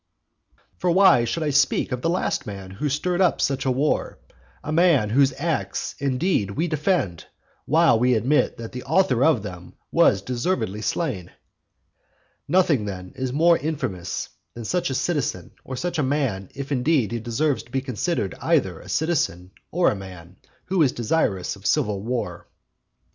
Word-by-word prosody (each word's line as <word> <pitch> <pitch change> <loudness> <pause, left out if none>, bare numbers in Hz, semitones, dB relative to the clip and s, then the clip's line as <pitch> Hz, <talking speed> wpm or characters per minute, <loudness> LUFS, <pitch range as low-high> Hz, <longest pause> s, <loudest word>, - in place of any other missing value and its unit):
For 180 - +1
why 170 -10 +5
should 160 +7 -2
I 150 - 0
speak 140 - +2
of 125 -1 -2
the 165 - 0
last 180 +2 -1
man 95 -2 -7
who 130 +10 -2
stirred 175 +6 0
up 180 - +3
such 135 -1 0
a - - +3
war; 140 +4 0 0.5
a 155 - -4
man 155 -10 +3
whose 135 +3 +4
acts, 135 - -2
indeed, 135 - 0
we 155 +12 -1
defend, 155 - -1 0.4
while 160 -5 +4
we 125 +1 +3
admit 130 +7 +1
that 115 -1 -7
the 125 - -6
author 155 -4 +2
of 145 -9 +3
them 90 -4 -9 0.2
was 95 0 +4
deservedly 120 - -2
slain? 105 - -2 1.2
Nothing, 160 - +3
then, 90 -2 -7
is 130 -1 -3
more 165 +5 +4
infamous 130 - -3 0.3
than 115 -1 -7
such 175 +6 0
a 130 - -2
citizen 135 - -2
or 130 - -6
such 170 +6 -3
a - - +3
man; 130 -9 -1
if 140 +1 -6
indeed 130 - +1
he 120 - -2
deserves 125 +6 0
to 120 - -20
be 135 - 0
considered 130 - -2
either - - +1
a - - -13
citizen 95 - -1 0.2
or 175 +1 +3
a - - -3
man, 90 -2 -11 0.3
who 185 -1 +1
is 140 -5 +4
desirous 110 - 0
of 100 +1 -6
civil 100 -2 +1
war. 105 -6 -4
130 Hz, 170 wpm, -23 LUFS, 105-160 Hz, 1.2 s, why